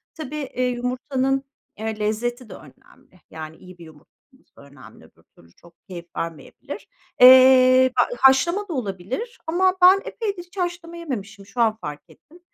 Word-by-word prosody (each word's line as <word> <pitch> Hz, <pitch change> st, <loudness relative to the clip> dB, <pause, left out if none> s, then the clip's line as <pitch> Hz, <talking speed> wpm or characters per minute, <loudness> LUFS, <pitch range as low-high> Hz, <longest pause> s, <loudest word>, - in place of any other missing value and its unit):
tabii, 305 Hz, -2 st, -7 dB
eee, 265 Hz, -3 st, -4 dB
yumurtanın, 255 Hz, +2 st, -2 dB, 0.4 s
eee, 220 Hz, 0 st, -4 dB
lezzeti 235 Hz, +3 st, -3 dB
de -, -, -9 dB
önemli. 185 Hz, -, -18 dB
Yani, 160 Hz, 0 st, -9 dB
iyi 185 Hz, -1 st, -15 dB
bir 170 Hz, -, -13 dB
yumurta 155 Hz, -1 st, -18 dB, 0.2 s
olması 265 Hz, -, -29 dB
da -, -, -17 dB
önemli 140 Hz, -1 st, -16 dB
öbür -, -, -25 dB
türlü 85 Hz, 0 st, -22 dB
çok 170 Hz, -, -21 dB
keyif 175 Hz, -2 st, -9 dB
vermeyebilir. 165 Hz, -1 st, -8 dB, 0.3 s
Eee, 255 Hz, 0 st, +7 dB
b -, -, +1 dB
haşlama 340 Hz, +10 st, +3 dB
da 350 Hz, -, -5 dB
olabilir 250 Hz, -, -5 dB
ama 370 Hz, +3 st, +2 dB
ben 375 Hz, +2 st, +7 dB
epeydir 405 Hz, -6 st, -5 dB
hiç 355 Hz, +2 st, -22 dB
haşlama 345 Hz, -2 st, -4 dB
yememişim. 205 Hz, -11 st, -7 dB
Şu 200 Hz, +5 st, -4 dB
an 220 Hz, -2 st, +2 dB
fark 150 Hz, 0 st, -7 dB
ettim. 330 Hz, +4 st, -21 dB
255 Hz, 165 wpm, -22 LUFS, 195-325 Hz, 0.4 s, Eee